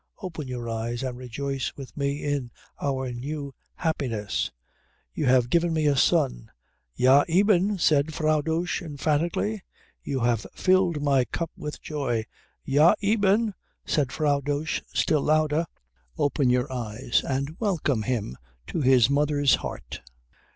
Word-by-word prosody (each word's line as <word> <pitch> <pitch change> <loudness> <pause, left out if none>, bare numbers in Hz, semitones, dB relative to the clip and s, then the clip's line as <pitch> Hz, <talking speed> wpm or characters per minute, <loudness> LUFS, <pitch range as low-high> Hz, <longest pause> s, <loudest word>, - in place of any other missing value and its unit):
Open 165 -8 -6
your 125 -2 -5
eyes 115 +2 -3
and 130 -2 -3
rejoice 135 +2 -4
with 135 -2 -9
me 140 0 -2
in 145 -4 -1 0.3
our 130 -2 -1
new 140 +3 -5 0.2
happiness. 125 - -2 0.6
You - - -1
have 125 -1 +3
given 170 0 +2
me 155 -1 +1
a 145 -1 +3
son." - - +2 0.5
"Ja 135 +3 +5
eben," 195 +2 +3
said 155 -2 +3
Frau 155 -1 +1
Dosch 165 +5 -1
emphatically. 165 +6 -1 0.4
"You 135 -2 -3
have 115 -2 +1
filled 185 -5 +2
my 135 -3 +3
cup 165 +5 -4
with 150 0 -7
joy." 130 -7 -2 0.4
"Ja 150 +5 +5
eben," 210 +1 +2 0.3
said 140 -4 0
Frau 145 -2 +1
Dosch, 145 +2 -2
still 155 -2 +2
louder. 155 +2 +2 0.5
"Open 140 -2 +1
your 125 +1 +1
eyes, 120 0 -1
and 140 +3 -2
welcome 165 - 0
him 105 - -3 0.3
to 165 - -3
his 130 -3 +5
mother's 145 0 +2
heart." - - -4
145 Hz, 135 wpm, -26 LUFS, 130-160 Hz, 0.6 s, Ja